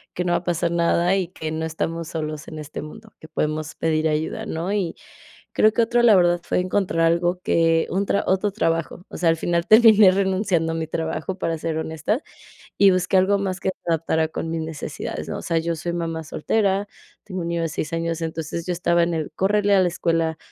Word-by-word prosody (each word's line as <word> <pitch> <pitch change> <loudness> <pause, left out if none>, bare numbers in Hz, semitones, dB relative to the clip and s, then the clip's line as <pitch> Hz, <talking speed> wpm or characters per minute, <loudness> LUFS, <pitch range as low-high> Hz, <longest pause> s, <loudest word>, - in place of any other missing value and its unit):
que 180 - -1
no 175 - +1
va - - +3
a - - -17
pasar 175 -1 0
nada 170 +2 +2
y 185 -3 -1
que 160 -3 -6
no 160 0 -2
estamos 165 +1 -3
solos 155 -2 -5
en 155 - -8
este 150 0 -7
mundo, 220 +8 -11
que 160 - -12
podemos 155 0 -2
pedir 160 -1 0
ayuda, 160 +8 -2
¿no?, 170 0 -3
y 190 -5 -1 0.6
creo 215 - +4
que 235 - +1
otro, 240 +1 +2
la 225 -4 +6
verdad, 175 -1 +3
fue - - 0
encontrar 185 -1 -1
algo 175 +2 +1
que 165 -2 +2
un, 195 +2 0 0.2
otro 190 +2 +1
trabajo, 165 -2 -2
o - - -9
sea, 170 -1 +2
al 165 - +2
final 170 +1 0
terminé 215 -3 +8
renunciando 190 -3 +1
a - - -3
mi 160 -1 -3
trabajo, 160 +3 -3
para 165 -2 -2
ser 160 -1 -2
honesta, 160 - -2 0.5
y 200 -1 +6
busqué 185 +1 +1
algo 195 +2 +3
más 190 -1 -2
que 190 - -1
se - - -4
adaptara 160 0 +1
con 160 +1 -5
mis 165 - -2
necesidades, 160 -2 -5
¿no?, - - -4
o - - -7
sea, 165 - -1
yo 165 +1 -1
soy 170 +2 -4
mamá 165 -1 -3
soltera, 200 +5 0 0.4
tengo 185 -3 -5
un 170 - -3
niño 170 0 -1
de 165 - -1
6 150 0 -4
años, 165 0 -2
entonces 160 0 -4
yo 180 - 0
estaba 170 0 +2
en 170 0 +1
el: 155 -1 -3
"Córrele 205 +3 +2
a 195 - +5
la 180 - +3
escuela, 165 -2 0
170 Hz, 220 wpm, -22 LUFS, 160-190 Hz, 0.6 s, terminé